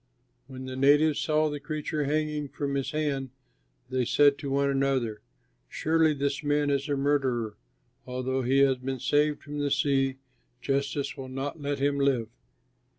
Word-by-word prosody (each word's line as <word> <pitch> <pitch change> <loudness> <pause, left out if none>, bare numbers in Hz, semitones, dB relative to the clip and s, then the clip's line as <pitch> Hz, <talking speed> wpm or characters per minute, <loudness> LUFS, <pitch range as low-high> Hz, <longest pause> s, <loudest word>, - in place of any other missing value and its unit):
When 130 -1 -8
the 130 0 -6
natives 145 +3 +4
saw 155 0 +2
the 145 - -4
creature 155 0 -3
hanging 150 0 -1
from 140 0 -3
his 135 -1 -1
hand, 145 -3 -1 0.6
they 130 -1 +1
said 140 +3 +4
to 140 - -4
one 140 +1 +2
another, 135 -6 0 0.5
"Surely 160 -1 +2
this 140 +1 -2
man 145 0 +1
is 140 +1 -1
a 140 - +1
murderer; 135 -6 0 0.5
although 130 +1 -2
he 130 +2 +3
has 135 -2 +4
been 130 +1 -4
saved 145 +3 +1
from 145 0 -6
the 145 0 0
sea, 135 -2 +1 0.4
justice 140 +1 -1
will 130 -1 -7
not 135 +4 -5
let 145 0 -2
him 140 +1 +1
live." 130 -5 +1
140 Hz, 160 wpm, -28 LUFS, 135-145 Hz, 0.6 s, natives